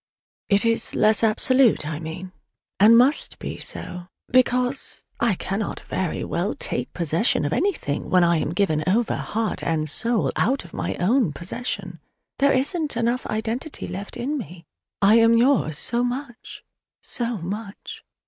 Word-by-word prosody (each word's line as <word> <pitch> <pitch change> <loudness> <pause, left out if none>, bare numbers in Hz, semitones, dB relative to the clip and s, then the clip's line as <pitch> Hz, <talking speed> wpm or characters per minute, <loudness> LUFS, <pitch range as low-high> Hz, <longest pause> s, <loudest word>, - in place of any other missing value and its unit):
It 200 +1 +4
is 230 0 0
less 215 +1 +3
absolute, 230 - +4
I 155 0 -4
mean; 170 +3 -7 0.5
and 220 +3 +7
must 265 +5 +2
be - - -6
so, 180 0 -4 0.2
because 250 +1 +1
I 235 -4 +2
cannot 195 +4 -4
very - - -3
well - - -2
take - - -3
possession 170 - 0
of - - -1
anything 340 - -1
when 180 -1 +4
I 170 -1 +3
am 155 - -1
given 160 -3 0
over 225 +5 +1
heart 220 0 -2
and 155 -2 -1
soul 230 +9 +2
out 265 -3 0
of 170 - -15
my - - -3
own 210 - +1
possession: 180 - -5 0.4
there 280 +1 +4
isn't 290 0 0
enough 240 +2 -1
identity 225 +7 -3
left 200 +6 -7
in 275 +5 -2
me, 170 - -10 0.4
I 215 +4 +6
am 230 0 +5
yours 235 - +2
so 235 +9 +1
much, 245 -1 -6 0.4
so 235 -2 -3
much! 200 +4 -7
220 Hz, 150 wpm, -23 LUFS, 180-245 Hz, 0.5 s, and